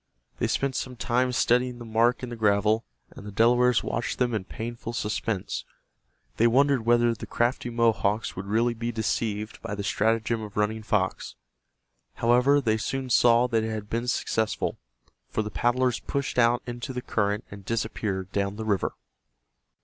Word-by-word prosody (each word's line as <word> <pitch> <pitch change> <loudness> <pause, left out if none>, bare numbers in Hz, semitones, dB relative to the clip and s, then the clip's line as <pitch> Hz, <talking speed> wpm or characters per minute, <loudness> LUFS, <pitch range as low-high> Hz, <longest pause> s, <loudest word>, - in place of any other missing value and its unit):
They - - +1
spent 135 -1 0
some 130 -1 -3
time 125 +2 +1
studying 125 0 +2
the 120 - -9
mark 115 +3 +2
in 125 - -4
the 120 - -5
gravel, 105 +1 +2 0.3
and - - -11
the 105 - -7
Delawares 120 +3 +4
watched 120 - -2
them 125 -2 +1
in 105 -4 -2
painful 115 +2 -6
suspense. 105 -3 -2 0.7
They 115 - +5
wondered 130 -1 +3
whether 120 0 +4
the 115 - -8
crafty 120 +1 0
Mohawks 115 -2 +1
would 95 +2 -6
really 115 +3 +2
be 115 +1 -3
deceived 110 -1 -2
by 110 -2 -4
the 100 - -4
stratagem 110 +2 +1
of 105 -1 -8
Running 105 +1 0
Fox. 105 -3 -1 0.8
However, 125 +5 +4
they 110 -5 +1
soon 130 +3 -3
saw 120 0 +5
that 115 -2 +1
it 110 - -2
had 105 -2 -5
been 115 +2 -1
successful, 110 -2 -1 0.5
for 110 - -1
the 105 - -6
paddlers 125 +1 +1
pushed 140 -2 -2
out 120 0 +3
into 120 +2 -5
the 125 0 -4
current 105 -1 0
and 100 0 -9
disappeared 100 -3 -2
down 100 0 -1
the 110 +1 -5
river. 100 -3 0
115 Hz, 170 wpm, -26 LUFS, 105-120 Hz, 0.8 s, They